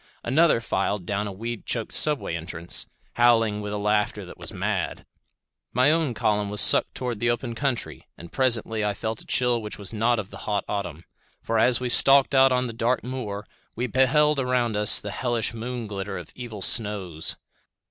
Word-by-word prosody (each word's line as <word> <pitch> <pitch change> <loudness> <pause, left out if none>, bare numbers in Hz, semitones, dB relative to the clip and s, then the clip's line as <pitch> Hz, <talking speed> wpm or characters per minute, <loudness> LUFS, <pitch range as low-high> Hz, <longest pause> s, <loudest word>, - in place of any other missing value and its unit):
Another 150 +2 +3
filed 105 -4 -2
down 100 +2 -2
a - - -5
weed 115 +3 -7
choked - - -2
subway 150 - +3
entrance, 85 +1 -4 0.3
howling 115 -3 +3
with 105 0 -5
a 105 - -3
laughter 105 0 -1
that - - -11
was - - -6
mad. - - -3 0.7
My 130 +4 +4
own 155 -6 0
column 105 -1 0
was 105 0 0
sucked - - +6
toward 125 -4 -4
the 120 - +1
open 120 0 -2
country, 130 0 -4
and 85 0 -12
presently 115 -4 0
felt 110 +2 -5
a - - -17
chill 125 -2 +1
which 105 -1 -6
was 100 +1 -8
not 115 +2 +1
of 105 -3 -6
the - - -9
hot 105 -1 -1
autumn; 90 -6 -5 0.4
for 115 - 0
as 125 -1 +3
we 125 - -3
stalked 135 +3 +6
out 135 0 +5
on 125 0 +1
the 115 - -6
dark 115 +2 -1
moor, 115 -5 -6 0.3
we 120 - -2
beheld 140 +4 +2
around 125 -3 0
us 105 0 +4
the 100 - -6
hellish 120 -1 -1
moon 120 +1 -5
glitter 100 -1 -5
of 90 -3 -10
evil 115 -5 -8
snows. 95 -7 +2
115 Hz, 190 wpm, -24 LUFS, 105-125 Hz, 0.7 s, sucked